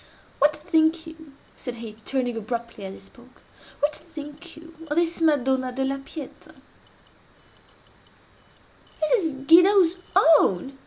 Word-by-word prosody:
What 295 +2 +4
think 320 +2 +1
you," 315 -3 -13 0.2
said 250 -3 -7
he, 230 -2 -8
turning 245 +2 -3
abruptly 230 -1 -5
as 190 0 -7
he - - -13
spoke—"what 295 +1 -7
think 300 +3 -11
you 325 +1 -13 0.2
of 295 - -2
this 340 0 0
Madonna 265 -4 +1
della 270 +2 -2
Pieta?" 275 +1 -10 2.5
"It 395 +11 +3
is 320 -6 -2
Guido's 355 +2 +6 0.4
own!" 265 +9 -1
290 Hz, 115 wpm, -24 LUFS, 255-325 Hz, 2.5 s, Guido's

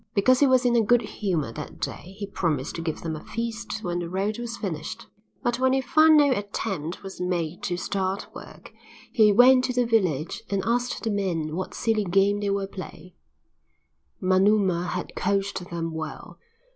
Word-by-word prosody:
Because 255 +5 +4
he 285 - +5
was 255 -1 +3
in 240 -1 +3
a 235 - +5
good 240 +2 +3
humour 170 - -2
that 80 -7 -8
day 185 - -6
he 210 - -4
promised 160 -8 -2
to 165 - -5
give 160 -2 -3
them 160 -1 -3
a 155 - -9
feast 230 -1 -4
when 175 -1 -2
the 170 -1 -4
road 200 +5 -2
was 235 0 -5
finished. 195 +4 -5 0.4
But 240 -1 0
when 260 0 +3
he 265 - +2
found 310 +4 +5
that 290 - +6
no - - +2
attempt 190 -6 -4
was 195 -1 -8
made 175 -2 -2
to 175 - -2
start 190 +1 -2
work, - - -12 0.4
he 215 -3 +5
went 255 +4 +6
to 250 - -2
the 245 0 +2
village 185 - 0
and 195 -2 -1
asked 245 +1 -1
the 225 - 0
men 170 -6 -1
what 185 +1 -4
silly 225 -3 +1
game 195 +2 +2
they 205 -1 -1
were 200 0 0
playing. 185 -2 -10 1.1
Manuma 185 -1 +3
had 180 0 -4
coached 195 -1 -1
them 165 -1 -3
well. 160 -1 -7
195 Hz, 190 wpm, -25 LUFS, 175-230 Hz, 1.1 s, that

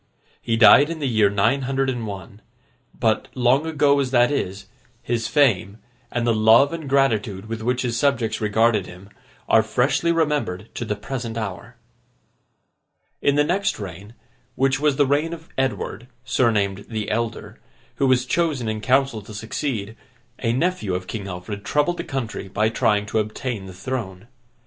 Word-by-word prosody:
He 115 - 0
died 120 +7 +7
in 165 - -4
the 150 - -3
year 110 -4 +3
nine 105 +7 +2
hundred 135 +1 -1
and 120 -4 -2
one; 100 +1 -8 0.6
but, 110 -3 +1
long 130 +5 +2
ago 145 -2 +3
as 135 -2 0
that 120 0 +3
is, 100 -8 -3 0.4
his 115 -2 -1
fame, 110 -6 +2 0.3
and 120 -1 -2
the 120 - +3
love 110 +7 +5
and 160 -4 -6
gratitude 110 -8 +1
with 115 0 -5
which 125 +3 0
his 120 -2 -1
subjects 125 -7 0
regarded 110 -1 +2
him, 90 +3 -12 0.4
are 110 - +5
freshly 135 +9 +1
remembered 150 - -1
to 120 - -4
the 105 - -2
present 120 0 -5
hour. 110 +2 -6 1.5
In 140 - +2
the 145 - +4
next 195 - 0
reign, 100 +3 -8 0.4
which 135 0 +1
was 150 -2 +2
the 145 - +3
reign 145 +5 0
of 165 -1 -10
Edward, 125 -2 -2 0.2
surnamed 100 -6 +1
The 110 -3 -3
Elder, 115 +1 -3 0.4
who 135 - +2
was 130 -1 +3
chosen 145 -4 0
in 110 0 -2
council 130 0 +2
to 105 +1 -11
succeed, 110 -1 -4 0.5
a 115 - +1
nephew 130 - 0
of 90 0 -4
King 100 0 -6
Alfred 95 +3 -6
troubled 150 +4 +1
the - - -3
country 120 -6 -4
by 105 +3 +1
trying 105 -2 +1
to 105 +1 -1
obtain 110 -1 -4
the - - -8
throne. 95 -2 -5
115 Hz, 170 wpm, -22 LUFS, 105-135 Hz, 1.5 s, died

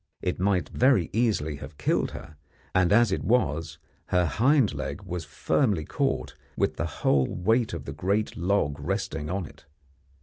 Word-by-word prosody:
It 90 - -1
might 95 -1 +1
very 125 - +3
easily 100 -10 0
have 70 - -10
killed - - +1
her, 80 - -10 0.4
and 90 -1 +3
as 115 0 +5
it 95 - -1
was 80 - 0 0.3
her 90 -1 +2
hind 125 - +3
leg - - -5
was 85 -2 -5
firmly 100 - 0
caught, - - -1 0.2
with - - 0
the - - -1 0.2
whole 65 -2 +4
weight 110 +6 +1
of 85 -5 -6
the - - -5
great 100 +4 -1
log 85 -5 0
resting 75 -1 -3
on 95 0 -2
it. - - -15
90 Hz, 165 wpm, -27 LUFS, 80-110 Hz, 0.4 s, as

